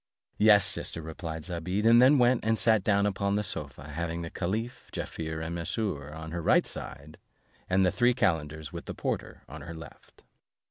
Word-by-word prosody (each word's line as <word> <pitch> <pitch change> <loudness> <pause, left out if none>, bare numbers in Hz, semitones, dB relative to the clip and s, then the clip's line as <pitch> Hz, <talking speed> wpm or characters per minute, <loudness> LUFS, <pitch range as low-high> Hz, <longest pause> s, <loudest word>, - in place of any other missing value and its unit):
"Yes, 105 -2 +6
sister," - - 0
replied 80 0 -6
Zobeide; 90 +4 -2
and 115 +1 +7
then 135 +3 +6
went, 125 -1 +3
and 110 0 +1
sat 110 -3 +3
down 100 0 +2
upon 100 0 0
the 105 - 0
sofa, 75 -6 -6
having 85 +2 -3
the 85 - -6
caliph, 110 +7 -4
Jaaffier, 80 -1 -5
and 80 +1 -4
Mesrour, 85 -4 -3
on 80 +1 -8
her 85 0 -3
right - - +3
hand, 75 +2 -8 0.5
and 95 +1 +3
the 90 - +3
three 120 0 +3
calenders, 80 - -1
with - - -7
the - - -6
porter, - - -4
on - - -9
her 85 -1 -8
left. 80 - -14
90 Hz, 185 wpm, -28 LUFS, 80-105 Hz, 0.5 s, and